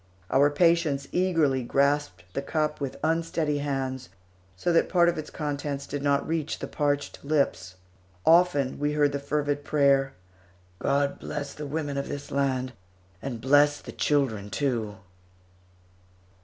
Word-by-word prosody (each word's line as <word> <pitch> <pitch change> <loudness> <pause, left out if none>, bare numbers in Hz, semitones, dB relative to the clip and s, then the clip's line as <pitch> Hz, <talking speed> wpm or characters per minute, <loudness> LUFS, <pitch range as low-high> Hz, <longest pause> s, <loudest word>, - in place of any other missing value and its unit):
Our 140 +2 +5
patients 150 -3 +2
eagerly 165 -8 +2
grasped 140 -6 0
the - - -2
cup 150 +1 -1
with 135 -2 -3
unsteady 160 -2 0
hands, 135 -2 -3 0.5
so 175 - 0
that 165 - +3
part 175 -1 +4
of 175 - -2
its 155 - -6
contents 145 -2 -4
did 145 0 -4
not 140 0 +1
reach 160 -2 -2
the - - -5
parched 145 -2 -2
lips. 140 -11 0 0.5
Often, 165 -6 +4
we 145 +1 0
heard 145 -1 +3
the 140 - -2
fervid 145 0 -1
prayer, 140 -2 +3 0.7
"God 140 0 0
bless 145 -1 -5
the 150 -1 -6
women 145 -1 -3
of 140 - -4
this 145 0 -6
land, 130 -2 0 0.5
and 125 -4 -5
bless 145 +4 +4
the - - -9
children 120 -9 0
too!" 110 -1 -1
145 Hz, 140 wpm, -27 LUFS, 135-150 Hz, 0.7 s, Our